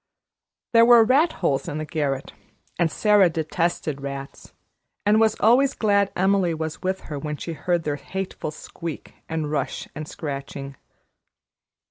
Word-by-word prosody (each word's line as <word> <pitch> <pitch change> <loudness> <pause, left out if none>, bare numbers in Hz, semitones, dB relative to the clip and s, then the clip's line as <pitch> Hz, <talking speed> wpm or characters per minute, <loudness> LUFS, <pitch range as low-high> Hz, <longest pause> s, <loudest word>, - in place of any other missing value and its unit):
There 230 0 +7
were 235 -1 +8
rat 275 +9 +4
holes 135 -1 +1
in 145 - -3
the 155 - -3
garret, 145 -4 -2 0.5
and 170 -2 +2
Sara 210 -2 +4
detested 160 -2 -2
rats, 140 0 -7 0.5
and 210 +1 +4
was 220 -1 +3
always 260 +5 +4
glad 200 -2 +2
Emily 190 -2 +2
was 160 0 -5
with 190 +1 -2
her 150 -2 -6
when 150 0 -4
she 165 - -5
heard 170 +3 -1
their 145 -2 -2
hateful 190 +3 -5
squeak 160 +1 -8 0.2
and 160 -2 -2
rush 140 -3 -2
and 150 0 -6
scratching. 140 -2 -6
165 Hz, 145 wpm, -24 LUFS, 150-200 Hz, 0.5 s, were